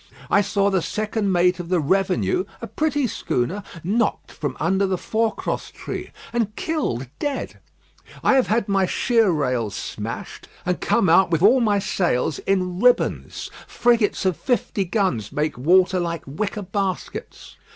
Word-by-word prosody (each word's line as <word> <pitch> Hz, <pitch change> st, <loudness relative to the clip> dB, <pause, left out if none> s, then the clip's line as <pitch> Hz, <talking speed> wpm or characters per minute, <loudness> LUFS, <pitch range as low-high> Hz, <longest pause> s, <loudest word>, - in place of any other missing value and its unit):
I 200 Hz, -, +5 dB
saw 200 Hz, 0 st, +1 dB
the 190 Hz, -2 st, +2 dB
second 215 Hz, +1 st, -1 dB
mate 180 Hz, 0 st, +3 dB
of 175 Hz, -1 st, -6 dB
the 180 Hz, -1 st, +2 dB
Revenue, 195 Hz, -, +1 dB
a -, -, -5 dB
pretty 295 Hz, -3 st, 0 dB
schooner, 190 Hz, -, -2 dB, 0.2 s
knocked 215 Hz, +5 st, 0 dB
from 145 Hz, -4 st, -4 dB
under 190 Hz, +4 st, +2 dB
the 185 Hz, -1 st, 0 dB
forecross 220 Hz, +4 st, -2 dB
tree, -, -, -6 dB, 0.2 s
and 220 Hz, -3 st, -1 dB
killed 295 Hz, -, -2 dB
dead. 290 Hz, -1 st, -3 dB, 0.6 s
I -, -, +4 dB
have 265 Hz, -2 st, +3 dB
had 220 Hz, 0 st, +1 dB
my 195 Hz, -2 st, +2 dB
sheer 230 Hz, +1 st, +2 dB
rails 125 Hz, -, 0 dB
smashed, -, -, -6 dB, 0.2 s
and 180 Hz, 0 st, -1 dB
come 230 Hz, -5 st, +2 dB
out 170 Hz, +3 st, +5 dB
with 165 Hz, 0 st, +1 dB
all 245 Hz, +6 st, +6 dB
my 210 Hz, -3 st, +3 dB
sails 175 Hz, -7 st, 0 dB
in 185 Hz, -2 st, -1 dB
ribbons. 250 Hz, +2 st, +1 dB, 0.2 s
Frigates 235 Hz, -4 st, +2 dB
of 185 Hz, -4 st, +1 dB
fifty 225 Hz, -5 st, -1 dB
guns 175 Hz, -, -1 dB
make 150 Hz, +2 st, -1 dB
water 185 Hz, +7 st, +3 dB
like 170 Hz, -2 st, -3 dB
wicker 200 Hz, +8 st, -3 dB
baskets. 195 Hz, 0 st, -4 dB
195 Hz, 150 wpm, -22 LUFS, 170-220 Hz, 0.6 s, all